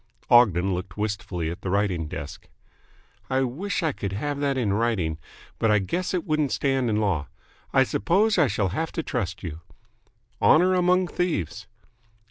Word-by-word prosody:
Ogden 100 -6 +5
looked 90 +1 -5
wistfully 100 -6 -3
at 90 +4 -8
the 95 - -4
writing 95 -5 0
desk. 75 +1 -8 0.8
"I 130 0 +1
wish 165 +11 -2
I 160 - +2
could 100 -7 -5
have 145 +7 -3
that 140 -2 0
in 110 -6 +1
writing. 100 -8 0 0.4
But 115 - +2
I 105 - +5
guess 170 - -2
it 180 - -2
wouldn't 155 -4 0
stand 135 -3 +1
in 105 - +1
law. 95 -9 0 0.4
I 135 - +5
suppose 195 - +2
I 155 - +5
shall 100 -3 0
have 160 - -2
to 165 - -2
trust 95 -11 -3
you." 80 -2 -6 0.8
"Honour 180 +4 +5
among 180 0 +3
thieves." 105 - -2
110 Hz, 165 wpm, -25 LUFS, 95-155 Hz, 0.8 s, Ogden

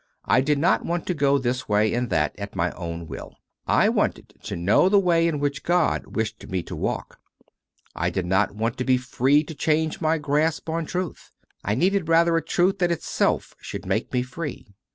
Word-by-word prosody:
I 130 - +4
did 145 +2 +1
not 170 +6 +2
want 170 0 -2
to 180 - 0
go 140 -3 +3
this 125 -2 -2
way 105 +1 +3
and 120 0 -1
that 75 - +1
at 100 0 -6
my 85 -1 0
own 85 -1 -6
will: 70 -3 -9 0.3
I - - +4
wanted - - -1
to 105 - -4
know 95 - +3
the 205 - +5
way 170 -3 +3
hi 160 - -2
which 145 -1 -2
God 175 -1 0
wished 110 0 -3
me 95 -2 -2
to - - -7
walk. - - -4 0.8
I 90 +1 0
did 90 0 -2
not 95 +3 +1
want 115 +3 -2
to - - +1
be 130 0 +3
free 130 +3 +2
to 160 - -8
change 155 +1 0
my 160 +1 +2
grasp 150 +2 0
on 165 0 -2
truth: 180 -3 -4 0.3
I 100 - 0
needed 185 - +1
rather 165 0 +4
a 165 - +2
truth 185 +4 +1
that 175 -1 +2
itself 170 - 0
should - - -7
make - - -1
me 125 -1 +1
free. 145 +3 -6
140 Hz, 205 wpm, -24 LUFS, 110-165 Hz, 0.8 s, the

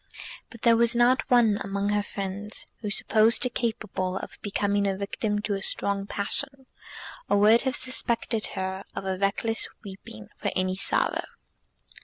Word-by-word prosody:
But 230 - -14
there 235 -1 +6
was 235 +1 +4
not 245 +2 +3
one 230 -4 +4
among 200 +1 -2
her 205 0 +2
friends 200 +1 -4
who 210 - -4
supposed 220 +2 +4
her 250 - +3
capable 215 -6 -2
of - - -8
becoming 205 -1 0
a 195 -1 -1
victim 205 +1 -2
to 210 - -1
a 195 - -3
strong 200 0 -2
passion, 270 +7 -2 0.6
or - - +4
would 220 +3 +6
have 260 - -1
suspected 230 -2 0
her 190 +1 -3
of - - -4 0.2
reckless 220 +3 0 0.2
weeping 190 - -10
for - - -1
any 185 0 0
sorrow. - - 0
205 Hz, 155 wpm, -26 LUFS, 195-230 Hz, 0.6 s, there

